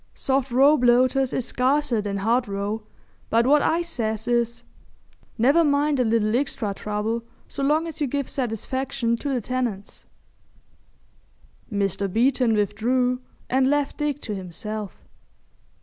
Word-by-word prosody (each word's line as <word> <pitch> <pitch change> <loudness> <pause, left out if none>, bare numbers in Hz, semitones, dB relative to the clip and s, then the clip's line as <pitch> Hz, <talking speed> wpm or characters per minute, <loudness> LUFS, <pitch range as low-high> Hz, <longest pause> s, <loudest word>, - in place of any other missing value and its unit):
Soft 270 0 0
roe 275 +5 +5
bloaters 255 +1 +3
is 255 - -2
scarcer 260 -2 +1
than 200 -1 -3
hard 230 +5 +1
roe, 200 +2 -3 0.5
but 230 +1 +3
what 290 +3 +5
I 335 +4 +1
says 220 -9 -3
is, 235 -1 0 0.7
"Never 275 +9 +4
mind 290 -1 +2
a - - +4
little 220 -1 +1
extra 245 -6 -1
trouble 215 +3 -3 0.2
so - - -6
long 300 +4 +2
as 320 -1 -7
you 290 - +2
give 280 +1 -2
satisfaction 255 0 -2
to 285 +4 -3
the 250 -3 0
tenants."' 235 -4 -4 1.6
Mr. 195 -1 -1
Beeton 245 +1 +2
withdrew 245 +5 0 0.3
and 260 +1 +2
left 290 -1 0
Dick 295 -2 -1
to 215 - -4
himself. 200 +2 -6
245 Hz, 135 wpm, -24 LUFS, 215-275 Hz, 1.6 s, roe